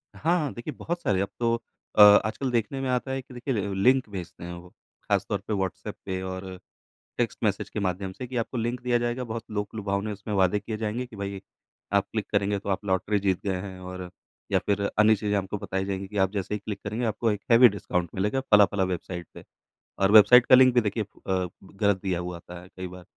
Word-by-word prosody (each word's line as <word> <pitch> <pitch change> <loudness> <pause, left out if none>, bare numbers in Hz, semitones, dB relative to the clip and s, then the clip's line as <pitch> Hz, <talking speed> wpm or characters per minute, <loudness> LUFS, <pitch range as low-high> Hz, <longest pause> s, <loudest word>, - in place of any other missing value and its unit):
हाँ, 170 +3 +1
हाँ। 150 -4 -2
देखिए 120 +6 -6
बहुत 175 +1 -4
सारे 95 - +1
अब 100 - -2
तो 115 -1 +2 0.4
अ, - - +6
आजकल 105 +5 +6
देखने 120 +3 -1
में 135 - -2
आता 125 +1 -1
है 135 0 -2
कि 130 0 -16
देखिए 125 +2 -3
ल 100 -3 -2
लिंक 130 0 +4
भेजते 90 -4 -8
हैं 90 0 -6
वो 85 +1 -11
ख़ासतौर - - -3
पे - - -1
व्हाट्सएप 95 -2 -3
पे 95 -1 -3
और 95 0 -5 0.7
टेक्स्ट - - -1
मैसेज - - 0
के - - -4
माध्यम 95 -1 -2
से 125 +5 -7
कि 130 - -8
आपको 115 +2 -2
लिंक 120 +2 -1
दिया 125 -1 +2
जाएगा 120 +1 -2
बहुत 115 -1 -5
लोक-लुभावने 105 0 -2
उसमें 105 +1 -6
वादे 95 +1 +3
किए 110 +1 -5
जाएँगे 110 +3 -2
कि 120 - -13
भाई, 100 -1 -5 0.5
आप 100 -1 +4
क्लिक 110 -2 -3
करेंगे 100 -1 +1
तो 100 - -7
आप 95 +1 -1
लॉटरी 100 +2 +1
जीत 95 -2 0
गए 95 -2 0
हैं 95 -2 -8
और 90 0 -7 0.4
या - - +4
फिर 100 0 +1 0.2
अन्य 110 +1 +6
चीज़ें 105 0 -1
आपको 100 +1 -3
बताई 95 -1 -3
जाएँगी 95 0 -3
कि 105 +1 -7
आप 95 - 0
जैसे 100 0 -3
ही 105 - -1
क्लिक 105 0 -6
करेंगे 110 +4 -2
आपको 115 +1 0
एक 105 -1 -3
हेवी 120 +2 +9
डिस्काउंट 90 -3 -2
मिलेगा 105 +7 0
फला-फला 105 -1 +5
वेबसाइट 90 -1 -4
पे। - - -11 0.6
और 95 +1 +3
वेबसाइट 110 +3 +8
का - - +8
लिंक 130 -1 +6
भी 120 - +4
देखिए 110 +1 -1
अ, 95 -2 -3 0.2
गलत 100 0 0
दिया 95 -3 -1
हुआ 90 0 -5
आता 85 +1 -11
है 90 - -14
कई 95 0 -4
बार। 90 0 -11
105 Hz, 230 wpm, -26 LUFS, 95-115 Hz, 0.7 s, हेवी